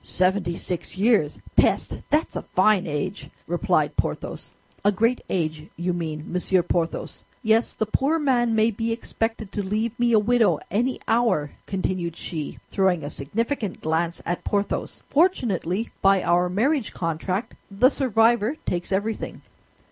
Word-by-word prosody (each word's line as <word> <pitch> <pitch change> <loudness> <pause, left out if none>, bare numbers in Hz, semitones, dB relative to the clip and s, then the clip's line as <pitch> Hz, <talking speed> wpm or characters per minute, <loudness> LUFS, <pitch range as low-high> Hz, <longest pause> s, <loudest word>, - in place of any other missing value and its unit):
"Seventy 185 -1 +1
six 180 +1 -5
years! 200 -8 +3 0.2
Peste! - - +2
That's 300 +3 +1
a - - -2
fine 190 0 +2
age!" 155 +6 -3 0.2
replied - - +1
Porthos. - - -3 0.3
"A 205 - +5
great 230 +5 +1
age, 155 -3 -2
you 175 +1 -1
mean, 160 -3 -3
Monsieur 180 0 +2
Porthos. 170 -1 -2 0.2
Yes, 225 +1 +2
the 220 - 0
poor 275 +9 +1
man 245 -6 +2
may 220 +1 +4
be 225 +2 -2
expected 225 -2 -3
to 205 - -2
leave 215 +4 -1
me 240 0 +3
a 225 - +6
widow, 215 -6 +3
any 245 +6 0
hour," 225 -11 +2 0.2
continued 185 -3 -2
she, 155 -5 -5
throwing 185 -5 +2
a 145 - -5
significant 215 - -2
glance 165 +2 -1
at 175 +1 -2
Porthos. 205 0 -2
"Fortunately, 230 - +1
by 195 -1 +4
our 175 +1 +3
marriage 245 - +1
contract, 180 +5 -2 0.2
the 210 +6 +4
survivor 235 -1 +2
takes 175 +1 -2
everything." 205 +3 -2
200 Hz, 145 wpm, -24 LUFS, 175-230 Hz, 0.3 s, a